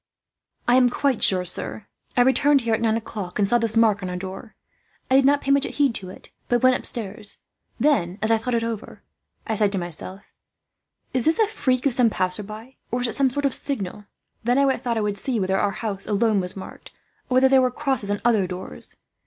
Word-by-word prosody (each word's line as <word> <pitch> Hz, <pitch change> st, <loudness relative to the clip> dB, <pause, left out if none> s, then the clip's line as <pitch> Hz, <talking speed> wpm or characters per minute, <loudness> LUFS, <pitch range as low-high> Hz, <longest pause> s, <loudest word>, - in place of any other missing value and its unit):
"I 245 Hz, +1 st, +5 dB
am 250 Hz, -1 st, +5 dB
quite 270 Hz, -1 st, 0 dB
sure, 185 Hz, -1 st, +5 dB
sir. 190 Hz, +4 st, -3 dB, 0.3 s
I -, -, +6 dB
returned 265 Hz, +3 st, +4 dB
here 230 Hz, -1 st, -1 dB
at 220 Hz, -, 0 dB
nine 225 Hz, -1 st, +2 dB
o'clock, 205 Hz, -5 st, -6 dB
and 205 Hz, -2 st, +2 dB
saw 240 Hz, +4 st, +3 dB
this 225 Hz, -1 st, 0 dB
mark 215 Hz, -3 st, +3 dB
on 185 Hz, -, -4 dB
our 180 Hz, -, -4 dB
door. 190 Hz, +4 st, -8 dB, 0.6 s
I -, -, +5 dB
did 270 Hz, 0 st, +5 dB
not 285 Hz, +1 st, +3 dB
pay 275 Hz, -, 0 dB
much 280 Hz, 0 st, +3 dB
heed 280 Hz, -4 st, +3 dB
to 185 Hz, -4 st, -1 dB
it, -, -, -13 dB, 0.2 s
but 240 Hz, 0 st, +1 dB
went 255 Hz, 0 st, +5 dB
upstairs. 210 Hz, -3 st, -1 dB, 0.4 s
Then, 195 Hz, -, +1 dB
as 215 Hz, +2 st, +2 dB
I 225 Hz, -, +3 dB
thought 240 Hz, +2 st, -2 dB
it 230 Hz, -, 0 dB
over, 230 Hz, -2 st, -6 dB, 0.4 s
I 220 Hz, -, -2 dB
said 210 Hz, -1 st, +1 dB
to -, -, -1 dB
myself, 180 Hz, +2 st, -4 dB, 0.8 s
'Is 255 Hz, -3 st, +1 dB
this 320 Hz, -, +3 dB
a 445 Hz, -, +4 dB
freak 260 Hz, -, -1 dB
of 275 Hz, -, +3 dB
some 245 Hz, -2 st, +3 dB
passerby, 215 Hz, +6 st, -4 dB
or 245 Hz, +1 st, -2 dB
is 245 Hz, -, 0 dB
it -, -, 0 dB
some 275 Hz, -2 st, +3 dB
sort 285 Hz, +3 st, -2 dB
of 275 Hz, -, +1 dB
signal?' 205 Hz, -7 st, -4 dB, 0.4 s
Then 245 Hz, +3 st, +2 dB
I 275 Hz, -1 st, +3 dB
thought 235 Hz, -2 st, -3 dB
I -, -, 0 dB
would 205 Hz, -1 st, -1 dB
see 245 Hz, -1 st, -1 dB
whether 190 Hz, 0 st, 0 dB
our 205 Hz, -, +1 dB
house 200 Hz, -1 st, -5 dB
alone 215 Hz, 0 st, +2 dB
was 180 Hz, +1 st, -3 dB
marked, 190 Hz, -, -10 dB, 0.4 s
or 255 Hz, -, 0 dB
whether 260 Hz, +1 st, +6 dB
there 265 Hz, 0 st, +5 dB
were 255 Hz, -, +2 dB
crosses 265 Hz, -5 st, -2 dB
on 205 Hz, 0 st, -2 dB
other 215 Hz, -6 st, +3 dB
doors. 180 Hz, -, -7 dB
225 Hz, 225 wpm, -23 LUFS, 200-255 Hz, 0.8 s, I